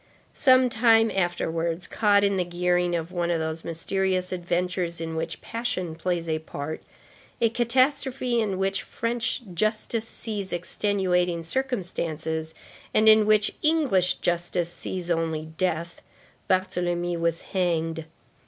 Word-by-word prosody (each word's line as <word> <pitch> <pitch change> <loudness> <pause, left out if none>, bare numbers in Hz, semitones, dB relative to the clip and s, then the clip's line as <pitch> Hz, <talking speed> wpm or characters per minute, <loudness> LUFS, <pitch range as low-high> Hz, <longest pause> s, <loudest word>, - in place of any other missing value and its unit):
Some 255 -2 +5
time 225 -2 +4
afterwards, 170 -2 -1
caught 205 -2 +3
in 200 -1 +3
the 185 - +1
gearing 175 0 +1
of 165 +1 -3
one 175 -1 -1
of 170 - +2
those 160 0 -3
mysterious 185 +2 -1
adventures 175 -1 -1
in 165 -1 -4
which 160 0 -4
passion 205 -8 -3
plays 170 0 -2
a 160 -1 0
part, 155 0 -6 0.6
a 230 - +3
catastrophe 250 0 +1
in 200 -4 -1
which 195 +1 0
French 240 +2 -2
justice 215 +3 -1
sees 205 -5 -4
extenuating 180 -2 0
circumstances, 165 - -3 0.4
and 215 +1 +4
in 215 -1 +7
which 215 -1 +3
English 280 - +3
justice 175 0 -1
sees 180 -2 -4
only 160 -2 -1
death, 170 +1 -3 0.5
Barthélemy 175 -2 0
was 165 0 0
hanged. 165 -3 0
180 Hz, 125 wpm, -26 LUFS, 170-215 Hz, 0.6 s, in